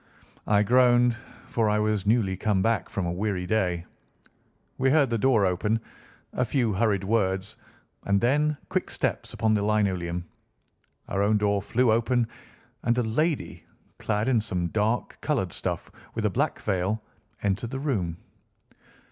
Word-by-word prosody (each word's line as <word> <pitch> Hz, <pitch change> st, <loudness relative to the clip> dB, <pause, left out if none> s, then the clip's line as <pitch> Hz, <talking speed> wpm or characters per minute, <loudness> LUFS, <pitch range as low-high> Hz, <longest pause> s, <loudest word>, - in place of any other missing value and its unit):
I 105 Hz, 0 st, +4 dB
groaned, 120 Hz, +1 st, +4 dB, 0.3 s
for 115 Hz, -2 st, 0 dB
I 105 Hz, -, +2 dB
was 105 Hz, -2 st, 0 dB
newly 105 Hz, -4 st, +2 dB
come 100 Hz, -1 st, +1 dB
back 115 Hz, 0 st, +1 dB
from 95 Hz, -, -2 dB
a 85 Hz, -, -1 dB
weary 95 Hz, 0 st, -2 dB
day. 90 Hz, -4 st, 0 dB, 0.9 s
We 135 Hz, +1 st, +3 dB
heard 140 Hz, -3 st, +3 dB
the 115 Hz, -, +2 dB
door 115 Hz, -4 st, +4 dB
open, 105 Hz, +5 st, +1 dB, 0.5 s
a 125 Hz, -, +1 dB
few 120 Hz, -3 st, 0 dB
hurried 100 Hz, -1 st, +1 dB
words, 95 Hz, 0 st, 0 dB, 0.5 s
and 100 Hz, 0 st, +3 dB
then 145 Hz, +6 st, +2 dB
quick -, -, -1 dB
steps -, -, -2 dB
upon 110 Hz, -1 st, +2 dB
the 105 Hz, -, +2 dB
linoleum. 95 Hz, -5 st, 0 dB, 0.8 s
Our 100 Hz, -, -1 dB
own 105 Hz, +1 st, +3 dB
door 100 Hz, -1 st, +1 dB
flew 120 Hz, +4 st, +2 dB
open, 115 Hz, +1 st, +2 dB, 0.5 s
and 120 Hz, 0 st, +1 dB
a 125 Hz, -, +2 dB
lady, 150 Hz, +8 st, -1 dB, 0.4 s
clad 105 Hz, +2 st, -1 dB
in 120 Hz, -4 st, +3 dB
some 90 Hz, -5 st, -2 dB
dark 110 Hz, +4 st, -1 dB
coloured 120 Hz, -, -1 dB
stuff, -, -, -4 dB, 0.2 s
with -, -, -1 dB
a -, -, +2 dB
black -, -, 0 dB
veil, 95 Hz, +4 st, -1 dB, 0.4 s
entered 100 Hz, +3 st, 0 dB
the 135 Hz, -, -4 dB
room. 105 Hz, -, -1 dB
110 Hz, 155 wpm, -26 LUFS, 95-120 Hz, 0.9 s, I